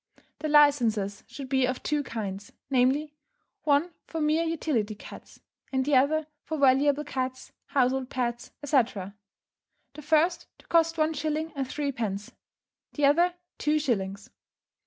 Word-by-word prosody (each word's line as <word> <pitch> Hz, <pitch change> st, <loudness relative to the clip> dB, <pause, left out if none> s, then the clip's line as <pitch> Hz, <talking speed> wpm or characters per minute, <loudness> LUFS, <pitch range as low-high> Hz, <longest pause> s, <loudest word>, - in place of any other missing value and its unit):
The 310 Hz, -, -3 dB
licences 235 Hz, -9 st, +3 dB
should 275 Hz, -2 st, -8 dB
be 265 Hz, -1 st, +2 dB
of 255 Hz, 0 st, -3 dB
two 300 Hz, -1 st, 0 dB
kinds, 205 Hz, -6 st, -5 dB, 0.2 s
namely: 270 Hz, +4 st, +2 dB, 0.5 s
one 300 Hz, +4 st, +3 dB, 0.2 s
for 325 Hz, -, -4 dB
mere 305 Hz, +1 st, +2 dB
utility 295 Hz, -10 st, -1 dB
cats, -, -, -12 dB, 0.3 s
and 265 Hz, -1 st, 0 dB
the 290 Hz, -1 st, +2 dB
other 300 Hz, +4 st, +3 dB, 0.2 s
for 315 Hz, -, -4 dB
valuable 280 Hz, +1 st, +4 dB
cats, 260 Hz, -2 st, -4 dB, 0.2 s
household 260 Hz, -1 st, +1 dB
pets, 240 Hz, -2 st, -3 dB
etc. 230 Hz, -9 st, +1 dB, 0.8 s
The 300 Hz, -, -9 dB
first 315 Hz, +4 st, +2 dB
to -, -, -21 dB
cost 330 Hz, -1 st, +2 dB
one 310 Hz, 0 st, +2 dB
shilling 310 Hz, +1 st, -2 dB
and 270 Hz, -2 st, -2 dB
threepence, 230 Hz, -9 st, -3 dB, 0.6 s
the 295 Hz, -, +2 dB
other 345 Hz, +5 st, +4 dB, 0.2 s
two 300 Hz, +1 st, +2 dB
shillings. 200 Hz, -9 st, -2 dB
280 Hz, 135 wpm, -27 LUFS, 245-305 Hz, 0.8 s, valuable